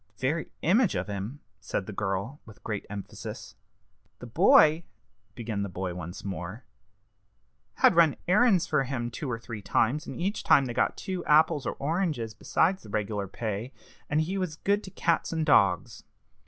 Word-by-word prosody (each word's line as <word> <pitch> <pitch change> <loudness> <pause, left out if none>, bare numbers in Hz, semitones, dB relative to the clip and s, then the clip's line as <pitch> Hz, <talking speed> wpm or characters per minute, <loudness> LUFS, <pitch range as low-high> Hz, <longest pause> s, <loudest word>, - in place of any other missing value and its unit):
"The 130 - -1
very 160 +4 -2
image 205 +5 +3
of - - -1
him!" 105 +8 -6 0.2
said 100 -1 -3
the 105 - -7
girl, 100 +7 -3
with 105 -4 -16
great 105 -3 -4
emphasis. 100 -1 -8 0.6
"The - - -10
boy," 155 +2 +5 0.5
began 110 -4 -3
the 100 - -3
boy 90 0 -4
once 85 +2 -8
more, 95 +4 -5 1.1
"had - - +5
run 165 -4 +5
errands 200 -1 +4
for 145 -3 +1
him 120 -2 -3
two 130 +4 -5
or 120 - -2
three 115 -2 -8
times, 130 +10 0
and - - -7
each 195 +4 -2
time 140 - +5
had 120 -2 -5
got - - +1
two 185 -3 -4
apples 150 -2 +4
or - - -1
oranges 150 - -1
besides 175 - +1
the 110 - -13
reg'lar 105 -1 -2
pay; 110 +4 -4 0.4
and 150 +1 +2
he 185 +5 -2
was 180 -5 -2
good 200 +5 0
to - - -8
cats 170 -3 0
and 160 -1 -1
dogs. 100 - +3
130 Hz, 175 wpm, -28 LUFS, 105-165 Hz, 1.1 s, boy